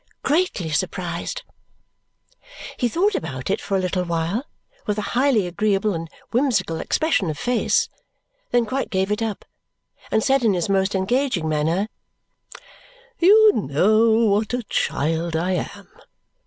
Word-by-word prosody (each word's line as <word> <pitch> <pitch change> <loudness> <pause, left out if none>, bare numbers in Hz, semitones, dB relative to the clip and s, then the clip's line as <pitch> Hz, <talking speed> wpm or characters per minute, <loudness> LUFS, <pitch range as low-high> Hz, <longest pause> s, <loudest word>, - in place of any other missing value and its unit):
"Greatly 280 - 0
surprised." 175 +1 -3 1.3
He 245 - 0
thought 390 - +1
about 135 - -3
it - - -1
for 195 - -1
a - - +1
little 185 0 -1
while 170 - -2 0.4
with 210 0 0
a 210 - -2
highly 250 -5 +3
agreeable 200 +3 0
and 165 -1 -5 0.2
whimsical 215 - +1
expression 310 - 0
of 155 - -4
face, 245 +8 +1 0.6
then 240 -1 +2
quite 265 +5 -2
gave 190 0 0
it 210 +2 -1
up 220 -3 -3 0.6
and 220 - +1
said 270 0 +3
in 210 -4 +3
his 175 +2 -1
most 195 0 +1
engaging 210 - 0
manner, 160 +6 0 1.3
"You 425 +4 +7
know 215 +8 +3 0.2
what 215 +4 +1
a 245 - -3
child 165 -3 -1
I 175 +3 0
am. 200 +2 -4
200 Hz, 140 wpm, -22 LUFS, 170-240 Hz, 1.3 s, You